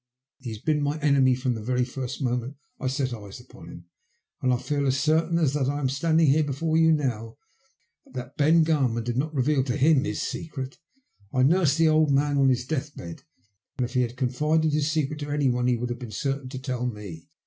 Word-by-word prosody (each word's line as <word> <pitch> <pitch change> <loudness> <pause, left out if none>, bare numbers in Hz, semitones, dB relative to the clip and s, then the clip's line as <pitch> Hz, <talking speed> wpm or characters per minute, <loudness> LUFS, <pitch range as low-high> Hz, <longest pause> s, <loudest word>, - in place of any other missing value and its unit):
He 130 -3 -7
has 110 - -6
been 150 +6 0
my 145 +1 -1
enemy 140 -4 +3
from 130 0 -1
the 110 - -5
very 125 +2 0
first 130 +1 -5
moment 125 +2 -2 0.2
I 130 - -2
set 130 -1 -1
eyes 105 -4 -9
upon - - -14
him, 85 - -11 0.6
and 130 - +2
I 125 - +2
feel 140 +2 -1
as 135 0 +1
certain 160 +3 +2
as 155 -5 +2
that 140 -2 0
I 145 +1 -2
am 135 -3 0
standing 155 +1 +3
before 150 +3 -2
you 160 0 +5
now, 120 -7 -1 0.7
that 130 -1 -7
Ben 160 +2 +4
Garman 135 -8 +1
did 120 0 -3
not 145 +5 -1
reveal 140 -1 +1
to 125 - -1
him 145 0 +4
his - - -3
secret. 135 -5 -6 0.5
I 130 - +2
nursed 155 0 +3
the 165 -1 +4
old 155 -1 +3
man 140 +1 +2
on 135 -1 +5
his 125 -1 0
death 150 0 -3
bed, 85 -1 -8 0.6
and 125 - 0
if 120 - -8
he 125 - +2
had 120 0 -3
confided 150 +5 +1
his 150 0 +1
secret 150 -1 -1
to 145 0 -5
any 145 -2 +1
one 125 0 0
he 125 -1 +2
would 120 +1 -3
have 120 - -5
been 125 -3 -7
certain 135 +5 -3
to 130 - -6
tell 130 -2 -3
me. 100 -8 -8
135 Hz, 225 wpm, -25 LUFS, 125-150 Hz, 0.7 s, you